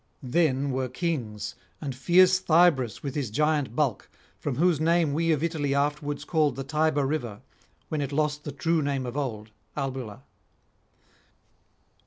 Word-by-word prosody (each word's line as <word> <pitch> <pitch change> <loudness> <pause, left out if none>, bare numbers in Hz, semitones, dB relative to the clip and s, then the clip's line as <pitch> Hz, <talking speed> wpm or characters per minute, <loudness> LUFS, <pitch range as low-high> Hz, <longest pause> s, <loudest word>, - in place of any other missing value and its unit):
Then 135 0 +1
were 130 0 -1
kings, 125 - -3 0.3
[330 140 -4 -3
364]and - - -21
fierce 185 +1 +6
Thybris 160 -9 +3
with 140 -3 -3
his 140 -6 -2
giant 150 0 0
bulk, 135 -8 0 0.3
from 145 -4 -2
whose 165 0 +2
name 165 -2 +2
we 165 +2 +1
of 155 -1 +1
Italy 150 -4 0
afterwards 145 0 -1
called 155 -6 +1
the 135 - -4
Tiber 150 0 +1
river, 125 -8 -3 0.5
when 155 -2 -1
it 140 -1 -3
lost 150 0 0
the 145 - -5
true 165 +1 0
name 140 -2 -1
of 125 +1 -5
old, 110 -7 -4 0.3
Albula. 130 -4 -4
145 Hz, 155 wpm, -27 LUFS, 130-155 Hz, 0.5 s, fierce